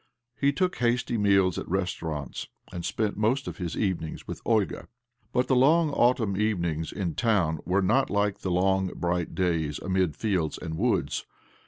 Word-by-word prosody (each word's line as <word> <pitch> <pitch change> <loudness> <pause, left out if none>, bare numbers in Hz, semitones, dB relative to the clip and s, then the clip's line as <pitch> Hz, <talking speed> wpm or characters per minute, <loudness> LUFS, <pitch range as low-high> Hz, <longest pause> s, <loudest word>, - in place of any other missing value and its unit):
He 140 0 +2
took 180 +6 0
hasty 120 0 +1
meajs 100 -4 +3
at - - -7
restaurants, 85 -7 -3 0.3
and 85 - -5
spent 105 +1 -1
most 120 +6 +1
of - - -5
his 90 -2 -3
evenings 90 -6 -2
with - - -6
Olga. 110 -4 0 0.4
But 125 +1 +2
the 130 - +3
long 155 +5 +4
autumn 120 -6 +2
evenings 85 -7 -1
in 90 -5 -3
town 95 -9 +1
were 95 +2 +2
not 130 +8 +2
like 100 -1 0
the 95 - -3
long, 95 +1 +2
bright 85 -1 -1
days 80 -5 0
amid 95 -5 0
fields 95 -8 -1
and 80 - -5
woods. - - 0
95 Hz, 165 wpm, -27 LUFS, 85-115 Hz, 0.4 s, long